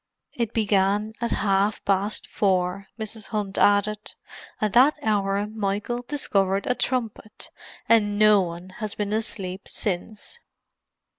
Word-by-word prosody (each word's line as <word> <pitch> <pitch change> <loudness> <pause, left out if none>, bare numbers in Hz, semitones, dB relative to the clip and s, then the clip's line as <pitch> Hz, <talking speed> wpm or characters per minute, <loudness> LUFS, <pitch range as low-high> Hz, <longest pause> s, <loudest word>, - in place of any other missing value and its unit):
"It 235 -2 -2
began 205 0 +1
at 235 - 0
half 200 +1 +1
past 200 +2 +1
four," 190 0 0
Mrs. 220 -1 -3
Hunt 205 -3 -2
added. 205 +1 +2 0.4
"At 215 -2 0
that 260 +5 +6
hour 200 -2 +1
Michael 210 +3 -2
discovered 200 -8 0
a 250 - +2
trumpet; 235 -4 -3 0.4
and 210 -3 +3
no 210 -1 +6
one 175 +1 -5
has 215 -2 -4
been 210 0 -2
asleep 195 -4 -2
since." 210 - -4
210 Hz, 125 wpm, -25 LUFS, 195-220 Hz, 0.4 s, that